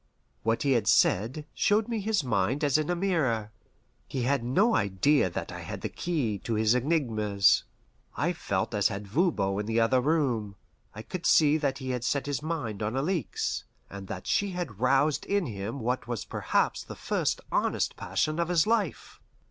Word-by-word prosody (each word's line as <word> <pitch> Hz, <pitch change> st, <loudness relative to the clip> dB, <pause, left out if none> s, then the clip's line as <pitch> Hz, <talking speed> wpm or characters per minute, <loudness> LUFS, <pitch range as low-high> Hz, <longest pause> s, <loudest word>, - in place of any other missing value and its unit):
What 115 Hz, +1 st, 0 dB
he 140 Hz, -, +2 dB
had 115 Hz, -5 st, +2 dB
said 115 Hz, +7 st, +3 dB
showed 210 Hz, +1 st, +2 dB
me 230 Hz, -2 st, -2 dB
his 210 Hz, -4 st, 0 dB
mind 125 Hz, +4 st, 0 dB
as 145 Hz, 0 st, +3 dB
in 155 Hz, -, -2 dB
a 175 Hz, -, +1 dB
mirror. 140 Hz, -, 0 dB, 0.6 s
He 130 Hz, -3 st, -3 dB
had 135 Hz, 0 st, +1 dB
no 195 Hz, -, +3 dB
idea 100 Hz, +4 st, +2 dB
that -, -, -5 dB
I -, -, -7 dB
had -, -, -7 dB
the -, -, -3 dB
key 135 Hz, -, -2 dB
to 115 Hz, -, -3 dB
his 110 Hz, +1 st, +3 dB
enigmas. 115 Hz, -, +2 dB, 0.5 s
I -, -, +1 dB
felt -, -, -2 dB
as -, -, +3 dB
had 100 Hz, +1 st, -5 dB
Voban 100 Hz, -, +1 dB
in 105 Hz, -, -2 dB
the 115 Hz, +1 st, +1 dB
other 125 Hz, +3 st, +3 dB
room. 125 Hz, -9 st, 0 dB, 0.4 s
I 110 Hz, -, -7 dB
could 180 Hz, +6 st, -4 dB
see 150 Hz, -1 st, +5 dB
that 140 Hz, -3 st, -1 dB
he 130 Hz, -2 st, -4 dB
had 125 Hz, -2 st, -3 dB
set 140 Hz, +2 st, 0 dB
his 145 Hz, -3 st, -2 dB
mind 150 Hz, -11 st, -4 dB
on 110 Hz, +4 st, -2 dB
Alixe, 165 Hz, +4 st, -2 dB, 0.3 s
and 100 Hz, -1 st, -8 dB
that -, -, -6 dB
she 200 Hz, -2 st, 0 dB
had 135 Hz, -, -5 dB
roused 135 Hz, +4 st, +2 dB
in 200 Hz, -2 st, +1 dB
him 110 Hz, +1 st, -5 dB
what 125 Hz, +2 st, -2 dB
was 120 Hz, -3 st, -4 dB
perhaps -, -, 0 dB
the -, -, -9 dB
first -, -, -1 dB
honest -, -, 0 dB
passion 155 Hz, +2 st, -1 dB
of 170 Hz, 0 st, 0 dB
his 170 Hz, -3 st, +3 dB
life. 210 Hz, -, -1 dB
130 Hz, 190 wpm, -28 LUFS, 110-160 Hz, 0.6 s, see